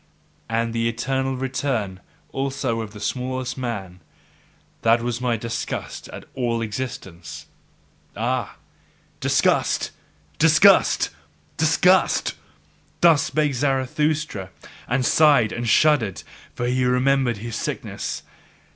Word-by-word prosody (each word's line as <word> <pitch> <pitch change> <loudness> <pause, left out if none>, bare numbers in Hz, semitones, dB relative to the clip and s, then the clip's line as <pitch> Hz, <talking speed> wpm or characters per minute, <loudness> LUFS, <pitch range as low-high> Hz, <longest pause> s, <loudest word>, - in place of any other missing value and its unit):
And 115 0 0
the 115 0 +1
eternal 130 +3 -1
return 125 -7 -2 0.3
also 135 -4 -2
of 110 -2 -7
the 105 - -11
smallest 130 +3 -3
man! 100 -8 -5 0.8
that 115 +1 +3
was 120 0 -2
my 120 -2 +1
disgust 115 +1 -5
at - - -9
all 120 -3 -1
existence! 105 -7 -6 0.7
Ah, 120 +1 -1 0.6
Disgust! - - +2 0.5
Disgust! - - +5 0.4
Disgust! 180 +4 +3 0.7
Thus 165 -4 +6
spake 150 -2 0
Zarathustra, 135 -4 -1 0.4
and 125 +1 +1
sighed 145 -8 +5
and 120 0 -2
shuddered; 135 -8 +3 0.3
for 120 - -2
he 125 +1 +1
remembered 125 -1 +2
his 115 +2 -6
sickness. - - -4
125 Hz, 100 wpm, -23 LUFS, 115-135 Hz, 0.8 s, Thus